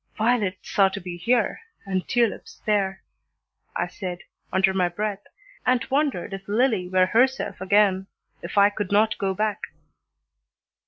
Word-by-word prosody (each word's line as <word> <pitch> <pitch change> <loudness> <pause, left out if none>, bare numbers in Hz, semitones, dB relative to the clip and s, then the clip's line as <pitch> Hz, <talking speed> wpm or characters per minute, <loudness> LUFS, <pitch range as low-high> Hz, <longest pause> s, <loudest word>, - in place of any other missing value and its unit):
"Violets 215 -4 0
are 195 -1 +7
to 195 +1 -5
be 175 -1 -7
here 230 - +1 0.2
and 190 -2 -2
tulips 240 - -1
there," 195 -3 0 0.7
I - - 0
said, 180 -1 -6 0.3
under 190 0 +3
my 180 -2 +2
breath, 205 +2 -3 0.4
and 250 -2 +2
wondered 275 - 0
if 195 0 -7
Lillie 215 -4 +1
were 185 0 +4
herself 250 +2 +1
again, 195 -1 +3 0.3
if - - -7
I 200 +1 +6
could 205 -2 -4
not 215 +2 +3
go 190 -1 -1
back. 210 0 -1
200 Hz, 145 wpm, -24 LUFS, 190-220 Hz, 0.7 s, are